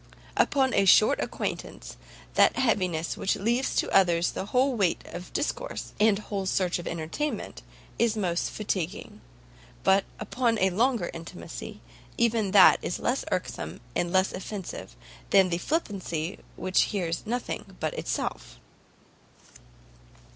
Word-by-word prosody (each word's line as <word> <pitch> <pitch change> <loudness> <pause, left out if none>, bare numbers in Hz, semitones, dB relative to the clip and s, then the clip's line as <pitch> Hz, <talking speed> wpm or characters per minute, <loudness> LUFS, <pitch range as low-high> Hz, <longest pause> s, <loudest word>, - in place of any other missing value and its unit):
Upon 265 -2 +2
a 200 - +3
short 215 +3 +6
acquaintance, - - -4 0.4
that - - +5
heaviness 185 -9 +1
which 195 - 0
leaves 240 +5 0
to - - +1
others 175 -3 +4
the 195 - -5
whole 260 +4 +2
weight 195 -6 +2
of 180 +1 -8
discourse, - - -3
and 210 -1 +5
whole 200 -2 -4
search 185 -2 +1
of 175 - -7
entertainment, 170 - -4 0.4
is 230 -2 +3
the 215 - -2
most 175 -2 0
fatiguing, 185 -5 -4 0.6
but, 195 0 +4
upon 230 +1 0
a 190 -1 +2
longer 230 -1 +1
intimacy, 165 - -8 0.4
even 225 -3 +2
that - - +7
is - - -2
less - - -1
irksome - - -3 0.2
and 175 - 0
less 190 +1 +2
offensive, 190 - -6 0.3
than 195 -2 +5
the 170 0 -1
flippancy 190 - -2 0.2
which 185 0 +2
hears 175 -5 -2
nothing 240 - -4
but - - -1
itself." - - -4
195 Hz, 135 wpm, -27 LUFS, 175-225 Hz, 0.6 s, that